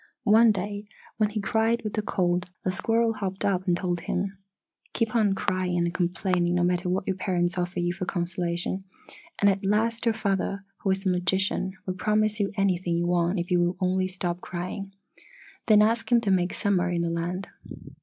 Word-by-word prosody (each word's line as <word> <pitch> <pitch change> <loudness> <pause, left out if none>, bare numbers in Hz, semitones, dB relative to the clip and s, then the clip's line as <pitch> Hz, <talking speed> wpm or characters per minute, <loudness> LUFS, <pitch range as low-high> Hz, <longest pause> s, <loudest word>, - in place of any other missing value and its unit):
"One 225 +1 +6
day 205 +1 -4 0.3
when 215 -2 +2
he 215 0 -3
cried 225 +3 +1
with 215 -1 -4
the 215 - 0
cold, 180 -3 0 0.2
a 185 - +2
squirrel 225 +4 +1
hopped 195 -3 -3
up 190 -1 0
and 175 -1 +3
told 175 -2 -1
him, 190 +3 -2 0.6
'Keep 225 0 -1
on 210 -4 +3
crying 185 -2 -1
and 170 0 0
complaining 175 0 0
no 175 - +2
matter 180 +1 +1
what 185 +1 0
your 190 -1 -1
parents 175 -2 0
offer 180 0 -2
you 175 0 0
for 185 0 -4
consolation, 175 0 -2 0.6
and 205 - +3
at 195 0 +2
last 225 +4 +1
your 225 - +3
father, 200 -1 -1
who 195 - -2
is 190 +1 0
a - - +3
magician, 190 +1 +1
will 185 - -2
promise 215 +2 +1
you 200 -1 +1
anything 185 -3 +1
you 170 - 0
want 175 +2 +1
if 175 +2 -4
you 175 - +4
will 175 +1 +1
only 185 0 +1
stop 180 -1 -3
crying. 185 +3 -5 0.8
Then 210 -2 +7
ask 230 +3 0
him 240 - +6
to 205 -4 0
make 180 -1 +2
Summer 185 -3 +1
in 170 -1 0
the 170 - -1
land! 175 +3 -3
185 Hz, 195 wpm, -26 LUFS, 175-205 Hz, 0.8 s, Then